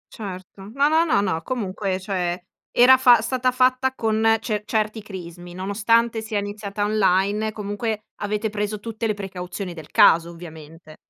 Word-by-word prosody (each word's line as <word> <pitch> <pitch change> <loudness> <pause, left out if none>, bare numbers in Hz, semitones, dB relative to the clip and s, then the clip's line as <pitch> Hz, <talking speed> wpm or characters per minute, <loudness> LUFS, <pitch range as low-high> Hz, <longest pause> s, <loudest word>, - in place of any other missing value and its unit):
Certo, 190 -2 -8
no, 280 +1 +3
no, 320 +1 +4
no, 310 -11 +2
no, 185 -5 -1
comunque 195 -4 -3
cioè 180 -2 -2 0.3
era 255 +2 +6
fa 245 -3 +6
stata 255 +2 0
fatta 255 +1 +1
con 225 -1 +2
ce 215 -3 -2
certi 215 0 -1
crismi, 175 -3 -10
nonostante 225 +4 +1
sia 215 -1 -3
iniziata 205 0 -4
online 205 +1 +1
comunque 210 +1 -4 0.2
avete 210 +1 -2
preso 210 0 -3
tutte 225 +1 -4
le 215 - -1
precauzioni 185 -1 -6
del 160 -3 -11
caso 165 +1 +5
ovviamente. 160 -2 -12
205 Hz, 150 wpm, -22 LUFS, 185-225 Hz, 0.3 s, era